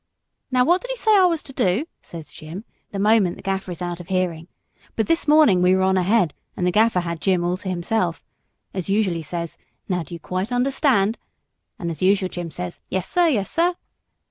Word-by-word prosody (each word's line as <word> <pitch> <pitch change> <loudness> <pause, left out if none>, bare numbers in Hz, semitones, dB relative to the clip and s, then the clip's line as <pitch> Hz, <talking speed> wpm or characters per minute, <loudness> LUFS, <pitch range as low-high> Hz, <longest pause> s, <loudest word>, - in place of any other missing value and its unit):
'Now 255 -1 +3
what 350 +5 +3
did - - -8
he - - -1
say 440 -3 +3
I 380 -2 +6
was 335 -3 +1
to 270 - -11
do?' 195 - +1 0.2
says 165 -2 -10
Jim, 165 +7 -9 0.2
the 200 - -6
moment 205 -3 +3
the - - -13
Gaffer 195 -1 -2
is 180 0 -5
out 175 0 -4
of 175 - -10
hearing. 180 -3 -1 0.5
But 220 - +1
this 330 -1 +1
morning 295 -12 +6
we 180 +1 +5
were 190 - +2
on 190 0 +3
ahead, 185 -2 +2 0.2
and 180 - 0
the 180 - +3
Gaffer 215 -1 +3
had 170 -1 -4
Jim 185 -3 +2
all 175 +1 0
to 190 0 -6
himself. 175 0 -1 0.5
As 185 -1 -4
usual 200 -2 +2
he 165 - -4
says, 170 +1 -5 0.3
'Now 180 -2 0
do 165 +2 -8
you - - -9
quite 185 +6 -3
understand?' 245 -4 +2 0.6
and 170 -1 -3
as 165 - -8
usual 190 0 +3
Jim 175 -2 -5
says, 180 +2 -6
'Yes, 190 -1 -2
sir; 350 -1 +3
yes, 210 - 0
sir.' 345 +2 +2
190 Hz, 220 wpm, -22 LUFS, 175-230 Hz, 0.6 s, I